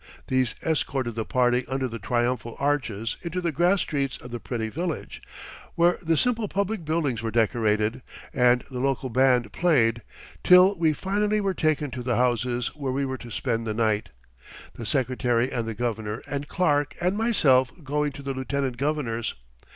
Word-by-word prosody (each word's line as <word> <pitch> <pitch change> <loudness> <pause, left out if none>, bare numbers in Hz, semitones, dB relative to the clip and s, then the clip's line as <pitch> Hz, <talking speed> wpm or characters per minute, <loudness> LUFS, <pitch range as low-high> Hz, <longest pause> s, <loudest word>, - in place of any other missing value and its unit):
These 130 -3 +1
escorted 135 -6 -1
the 110 0 -3
party 125 0 +2
under 130 +1 -1
the 115 -1 -6
triumphal 120 +1 -1
arches 120 -7 -1
into 170 +1 -3
the 170 -2 -1
grass 175 +6 +3
streets 140 -4 -2
of 125 - -11
the 120 - -4
pretty 115 -1 -3
village, 165 +7 -4 0.5
where 175 +1 +3
the 165 -2 +1
simple 230 0 +1
public 200 0 -2
buildings 150 -7 -1
were 115 - -2
decorated, 110 +1 +1 0.3
and 125 -1 +4
the 125 - -4
local 135 0 -1
band 125 -3 +3
played, 120 -9 +2 0.4
till 180 +2 +7
we 165 -4 +2
finally 205 +6 0
were 195 -2 0
taken 155 -4 0
to 125 +1 -5
the 120 -1 0
houses 120 0 +1
where 140 -3 -3
we 140 +2 0
were 130 -1 -4
to 120 - -10
spend 115 -1 -2
the 110 - -2
night, 110 -2 0 0.6
the 115 - -7
Secretary 125 -1 +1
and 115 -2 -2
the 115 - -4
Governor 110 -2 -3
and 145 0 -4
Clark 145 -5 +1
and 180 +2 +1
myself 155 - +3
going 145 +1 -1
to 140 - -9
the 135 0 -3
Lieutenant 130 -1 -2
Governor's. 130 -5 -1
130 Hz, 175 wpm, -25 LUFS, 120-155 Hz, 0.6 s, till